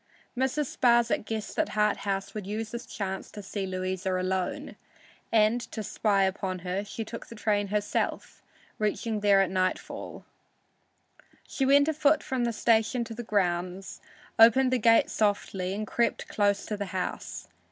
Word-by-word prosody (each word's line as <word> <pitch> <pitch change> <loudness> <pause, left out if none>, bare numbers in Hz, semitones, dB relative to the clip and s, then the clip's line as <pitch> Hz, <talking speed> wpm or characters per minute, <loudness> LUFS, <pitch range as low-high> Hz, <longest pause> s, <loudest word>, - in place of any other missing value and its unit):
Mrs. 265 +3 -1
Sparsit 235 -3 +3
guessed 220 -1 -4
that - - +1
Harthouse 200 -2 0
would 210 -3 -6
use 215 +1 -4
this 235 0 -6
chance 190 -2 -4
to 205 - -9
see 195 0 -4
Louisa 185 0 -2
alone, 185 0 -2 0.6
and, 225 +2 +3
to 220 - -4
spy 200 -1 +1
upon 190 -1 -1
her, 185 +2 -1
took 225 +2 -7
the 230 - -10
train 205 -2 0
herself, 205 +1 -2 0.4
reaching 215 +1 -1
there 200 -1 +5
at 185 - -3
nightfall. 185 -1 -3 1.2
She 270 - -1
went 285 +1 +5
afoot 310 -1 +2
from 255 -2 -1
the 235 - 0
station 225 +1 +2
to 230 0 -7
the 235 - -6
grounds, 185 -3 -2 0.4
opened 255 +3 +6
the 255 - +2
gate 230 +1 +4
softly 200 -3 0
and 215 +1 -3
crept 235 +2 0
close 205 -1 +1
to 215 - -3
the 200 0 -3
house. 180 - -4
210 Hz, 150 wpm, -28 LUFS, 195-230 Hz, 1.2 s, opened